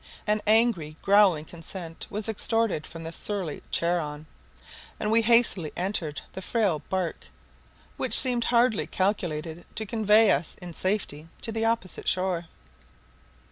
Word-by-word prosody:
An 210 0 +1
angry 215 -9 +2
growling 195 -6 +4
consent 165 0 -8
was 210 +1 -1
extorted 220 -5 0
from 165 0 -9
the 165 - -5
surly 185 -4 -2
Charon, 155 -3 -1 0.7
and 210 - -1
we 230 +1 +5
hastily 225 -8 +3
entered 175 -5 -2
the 190 - -6
frail 195 -5 0
bark, 185 -3 -3 0.7
which - - +5
seemed 245 -2 +2
hardly 240 -2 +2
calculated 175 -4 -2
to 220 - -3
convey 215 0 +4
us 165 - -1
in 175 -2 -9
safety 185 -5 -2
to 225 - -2
the 225 0 -1
opposite 225 -5 -1
shore. 185 -2 0
190 Hz, 135 wpm, -26 LUFS, 165-220 Hz, 0.7 s, we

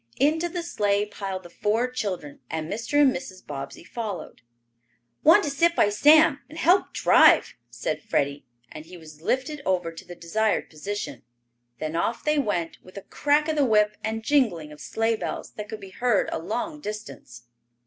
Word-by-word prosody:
Into 320 +5 +2
the 350 0 -4
sleigh 205 -9 0
piled 195 -2 -6
the 175 - -12
four 220 +6 0
children, 195 - -4
and 160 -1 -3
Mr. 230 - -1
and 275 -3 +5
Mrs. 185 -8 -8
Bobbsey 140 +2 -7
followed. 210 -1 -6 0.8
"Want 325 +2 +7
to 295 - -1
sit 335 +4 +2
by 205 - +4
Sam 295 +6 +5
and 315 - -11
help 360 +4 +3
drive," - - +5 0.2
said - - -3
Freddie, 140 0 -1 0.3
and 155 - -10
he 180 +1 -11
was 155 -2 -14
lifted 265 - -1
over 180 -5 0
to 165 +3 -11
the 175 -1 -10
desired 210 +6 -1
position. 170 - -5 0.6
Then 155 +3 -4
off 225 +7 -1
they 300 -1 +2
went, 175 -10 -2
with 185 +2 -14
a 200 - -7
crack 295 +1 +1
of 315 - 0
the 295 - +3
whip 210 -4 +3
and 220 0 -3
jingling 220 - +1
of 150 - -12
sleigh 225 0 0
bells - - -5
that 210 -1 -8
could 220 - -6
be 195 -2 -11
heard 240 0 +1
a - - -2
long 240 - -4
distance. 210 - -8
210 Hz, 180 wpm, -25 LUFS, 175-280 Hz, 0.8 s, Want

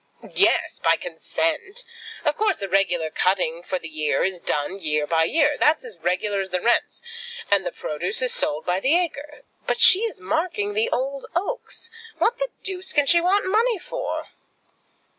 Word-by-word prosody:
"Yes; - - +2
by - - +3
consent. 390 0 -3 0.4
Of 300 -1 +2
course 420 -4 +1
the 195 - -2
regular 175 -4 +1
cutting 180 -3 0
for 185 +1 -3
the 165 - -8
year 155 -1 0
is 185 -2 -2
done, 150 +7 -2
year 150 -3 0
by 160 +1 +2
year. 295 - +2
That's 300 -3 +3
as 215 -8 -11
regular 185 +4 0
as 190 -1 -3
the 180 - 0
rents, 240 - +1 0.5
and 195 -2 +3
the - - -3
produce 155 +3 -2
is 255 - +3
sold 150 +2 +2
by 180 +1 +1
the 275 - +3
acre. 295 -4 -4 0.2
But - - 0
she 375 - +7
is 455 0 -3
marking 355 - -1
the 440 +3 +1
old 275 - -2
oaks. 460 +4 -3 0.3
What 480 - +1
the - - -1
deuce 375 -1 -2
can 290 -2 +3
she 340 +4 +5
want 385 +4 +2
money 445 +4 +2
for?" 355 - -5
265 Hz, 180 wpm, -23 LUFS, -, 0.5 s, she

